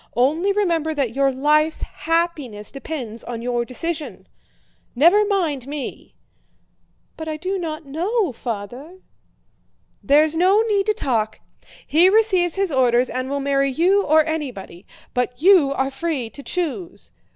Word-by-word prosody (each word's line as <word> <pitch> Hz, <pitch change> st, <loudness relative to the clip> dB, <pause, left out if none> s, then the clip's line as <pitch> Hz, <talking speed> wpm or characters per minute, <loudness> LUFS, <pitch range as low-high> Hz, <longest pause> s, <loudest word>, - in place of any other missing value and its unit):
Only 310 Hz, +11 st, +2 dB
remember 335 Hz, -6 st, 0 dB
that 265 Hz, -6 st, -1 dB
your 275 Hz, 0 st, +2 dB
life's 300 Hz, +4 st, +1 dB
happiness 310 Hz, -11 st, -2 dB
depends 270 Hz, -6 st, -6 dB
on 235 Hz, -1 st, -6 dB
your 240 Hz, -1 st, -1 dB
decision. 310 Hz, +6 st, -5 dB, 0.7 s
Never 345 Hz, -, +5 dB
mind 320 Hz, -, -1 dB
me!" 290 Hz, -2 st, -7 dB, 1.0 s
"But 320 Hz, -, -6 dB
I 310 Hz, -1 st, -3 dB
do 375 Hz, +4 st, -3 dB
not 320 Hz, -2 st, -5 dB
know, 355 Hz, -, -1 dB
Father!" 245 Hz, -, -7 dB, 1.0 s
"There's 300 Hz, +3 st, +3 dB
no 380 Hz, +6 st, +4 dB
need 405 Hz, -1 st, +1 dB
to 430 Hz, -, +2 dB
talk! 225 Hz, -, -1 dB, 0.5 s
He 340 Hz, +5 st, +4 dB
receives 380 Hz, -5 st, +2 dB
his 390 Hz, -3 st, 0 dB
orders 250 Hz, -2 st, +2 dB
and 255 Hz, +2 st, -3 dB
will 280 Hz, 0 st, -2 dB
marry 275 Hz, 0 st, +1 dB
you 370 Hz, +8 st, +3 dB
or 310 Hz, -1 st, +4 dB
anybody; 250 Hz, -, -5 dB, 0.3 s
but 250 Hz, 0 st, -2 dB
you 345 Hz, -4 st, +5 dB
are 270 Hz, 0 st, -1 dB
free 270 Hz, -5 st, -3 dB
to 280 Hz, -, -11 dB
choose.... 350 Hz, +3 st, -4 dB
305 Hz, 140 wpm, -21 LUFS, 260-345 Hz, 1.0 s, Never